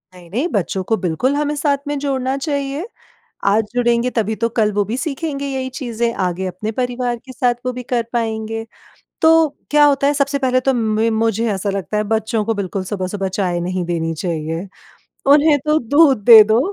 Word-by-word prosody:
नहीं, 175 -2 -15
नहीं, 255 - 0
बच्चों 195 - -2
को 225 - +2
बिल्कुल 195 - 0
हमें 295 0 -1
साथ 285 -1 +1
में 290 - -2
जोड़ना 265 -2 -1
चाहिए। 280 +2 -3 0.6
आज 210 +3 +3
जुड़ेंगे 240 0 +2
तभी 220 -3 -1
तो 230 +1 0
कल 220 -2 +1
वो 205 - +1
भी 225 +5 -3
सीखेंगे 280 -1 -3
यही 265 -1 -3
चीज़ें, 235 -3 -2
आगे 185 -2 -2
अपने 185 +4 -4
परिवार 245 +1 -2
के 260 - -10
साथ 250 -1 +1
वो 255 - 0
भी 250 - -6
कर 240 -1 -1
पाएँगे। 225 -1 -2 0.6
तो 320 -1 +5 0.2
क्या 295 0 +5
होता 280 -1 +3
है 290 - +2
सबसे 280 0 0
पहले 255 -2 +1
तो 270 +1 +1
म 220 -1 +1
मुझे 225 0 +1
ऐसा 200 +1 -2
लगता 195 -1 -3
है 210 - +2
बच्चों 220 +1 -1
को 225 +1 0
बिल्कुल 195 -1 -3
सुबह-सुबह 195 0 -3
चाय 185 -2 -1
नहीं 180 +1 -2
देनी 165 -1 -2
चाहिए। 165 +1 -3 0.7
उन्हें 295 0 +5
तो 305 0 +3
दूध 275 -3 +3
दे 225 -2 +11
दो 220 +2 +2
230 Hz, 195 wpm, -18 LUFS, 200-275 Hz, 0.7 s, दे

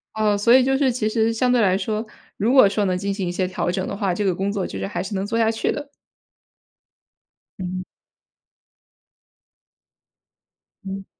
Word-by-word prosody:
哦， 210 -1 +2
所 230 +4 +4
以 260 - +7
就 270 +1 +2
是 270 -2 +2
其 235 -3 -1
实 225 +1 +1
相 245 +2 +1
对 245 -1 +3
来 190 -3 +3
说， 215 +2 -2 0.3
如 215 +4 +1
果 260 -6 +7
说 205 +1 0
能 185 -1 0
进 200 +1 -2
行 195 -2 -3
一 175 - -1
些 185 +1 -1
调 175 -1 -2
整 185 0 -2
的 - - -4
话， 195 -2 -1
这 205 +3 -2
个 185 -3 +1
工 195 +2 -1
作 200 -2 -2
就 - - -7
是 - - -3
还 195 - -3
是 195 +2 -5
能 190 - -1
做 230 +2 -1
下 225 -1 +3
去 225 0 -1
的。 290 -1 -6 1.7
嗯。 185 0 -4 3.0
嗯， 195 0 -6
205 Hz, 205 characters per minute, -22 LUFS, 190-230 Hz, 3.0 s, 以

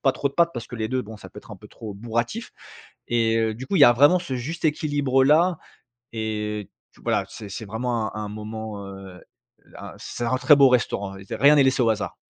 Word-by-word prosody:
pas 135 -2 +3
trop 140 - -1
de 140 - -15
pâtes 170 -1 +3
parce 120 - -6
que 120 - -8
les 110 0 -2
2 130 -1 -1
bon, 110 0 -11
ça - - -11
peut - - -12
être - - -15
un - - -9
peu - - -15
trop 110 -2 -9
bourratif, 120 - -3 0.6
et 115 -1 +2
heu, 110 -1 0
du 130 +3 -8
coup, 195 - -1
il - - +2
y - - +10
a 120 - +7
vraiment 145 +8 +5
ce 170 -7 -5
juste 160 +7 -3
équilibre 145 -4 +1
là, 165 +5 +4 0.6
et 105 -2 -3 0.3
t - - -20
voilà, - - 0
c'est 105 -2 -9
c'est 110 +3 -6
vraiment 110 +1 -3
un 105 - -4
un - - -5
moment, 105 -1 -7
heu, 95 -2 -11 0.6
un - - -9
c'est 120 - -6
un 130 +2 +1
très 145 +3 +6
beau 140 -2 +6
restaurant, 100 -5 0 0.2
rien 145 +4 +5
n'est 140 - +5
laissé 130 -1 +2
au 115 - +3
hasard. 110 - -4
120 Hz, 240 wpm, -24 LUFS, 110-140 Hz, 0.6 s, y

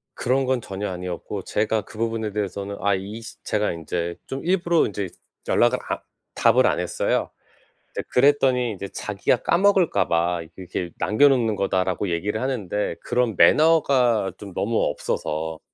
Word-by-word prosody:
그런 130 +2 +1
건 130 -1 0
전혀 100 0 -5
아니었고 90 +2 -5
제가 110 +1 0
그 110 - -14
부분에 115 -1 -2
대해서는 100 -1 -4
아 100 -1 +2
이 100 +4 -6
시 - - -10
제가 105 -1 0
인제 85 +1 -3
좀 135 +1 -5
일부러 175 -2 +2
인제 100 -2 -4 0.4
연락을 - - +3
안 - - -1 0.4
답을 - - +4
안 - - +1
했어요. - - -1 0.6
이제 - - -3
그랬더니 130 -3 +3
인제 100 -1 -6
자기가 105 +5 -1
"까먹을까 190 -1 +3
봐 85 +1 +1 0.2
이렇게 90 -1 -5
남겨 140 +7 +4
놓는 115 -6 +1
거다."라고 95 0 0
얘기를 100 +6 -1
하는데 105 -6 -2
그런 120 -4 0
매너가 125 - +4
좀 100 -2 -9
너무 110 +2 -1
없어서 80 +2 -3
105 Hz, 330 characters per minute, -23 LUFS, 95-125 Hz, 0.6 s, 답을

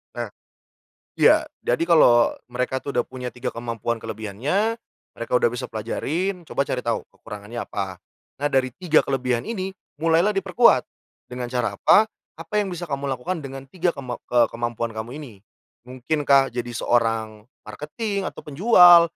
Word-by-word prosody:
Nah - - -4 0.9
iya. 310 +1 +6 0.2
Jadi - - +1
kalau 120 -8 +6 0.2
mereka 125 +1 -2
itu 140 +1 -6
udah 120 - +3
punya 130 -1 -7
3 125 0 -3
kemampuan 115 0 -3
kelebihannya, 120 - -2 0.4
mereka - - -6
udah 480 -1 +4
bisa - - -4
pelajarin, 180 +2 -3
coba - - -1
cari 130 -2 -2
tahu 115 - 0
kekurangannya 105 +2 -8
apa. 95 -2 -4 0.4
Nah, 145 - +2
dari 130 -3 +1
3 165 -1 +2
kelebihan 125 -3 -1
ini 195 -4 -3 0.3
mulailah 165 +5 +3
diperkuat. 195 - +4 0.5
Dengan 125 0 -4
cara 125 -1 0
apa? 220 - +5 0.3
Apa 210 - -5
yang 195 -2 -3
bisa 175 0 -6
kamu 140 0 -2
lakukan 160 +7 -4
dengan 135 0 -8
3 180 +5 0
kemam 130 -5 -6 0.2
eee, 120 -1 +5
kemampuan 120 0 -3
kamu 110 +2 -5
ini. 135 -8 -10 0.5
Mungkinkah 135 +1 +2
jadi 120 0 -3
seorang 115 -2 0 0.2
marketing 200 +6 -4
atau - - -12
penjual 175 +2 +7
135 Hz, 150 wpm, -23 LUFS, 120-175 Hz, 0.9 s, penjual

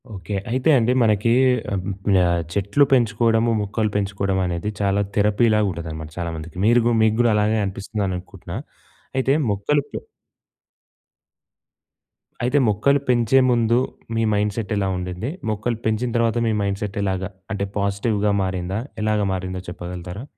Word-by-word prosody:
Okay. 100 +1 -5 0.2
అయితే 130 +5 +1
అండి 120 0 +2
మనకి 110 0 +3 0.4
ఆహ్, 95 -2 -2 0.7
చెట్లు 100 +8 +2
పెంచుకోవడము, 115 -1 +3
మొక్కలు 105 +2 -1
పెంచుకోవడమనేది 95 -2 -1
చాలా 100 0 +2 0.2
థెరపీ‌లాగా 105 +1 +3
ఉంటదనమాట 80 -2 -6
చాలామందికి. 85 -1 -5
మీరు 120 +2 +5
గూ 120 - +3
మీకు 110 0 +3
గూడా 120 -1 +4
అలాగే 105 +1 +2
అనిపిస్తుందని 100 0 -3
అనుకుంటున్నా. 90 - -9 0.6
అయితే 135 +1 +2 0.2
మొక్కలు 105 +9 +1
పె... - - -5 2.4
అయితే 125 +4 +2
మొక్కలు 110 +7 +3
పెంచే 120 +1 +4
ముందు 120 -1 +3 0.4
మీ 115 - +1
మైండ్‌సెట్ 105 +1 -1
ఎలా 100 -1 0
ఉండింది? 90 +6 -4 0.2
మొక్కలు 110 +2 -1
పెంచిన 110 +3 0
తర్వాత 115 0 +1
మీ 110 - +1
మైండ్‌సెట్ 100 0 -3
ఎలాగ 95 -1 -1 0.3
అంటే 100 -1 -1
పాజిటివ్‌గా 100 +1 0
మారిందా? 95 +1 -2 0.2
ఎలాగా 105 -1 +1
మారిందో 95 0 -4
చెప్పగలుగుతారా? 90 +3 -7
105 Hz, 125 wpm, -22 LUFS, 95-115 Hz, 2.4 s, మీరు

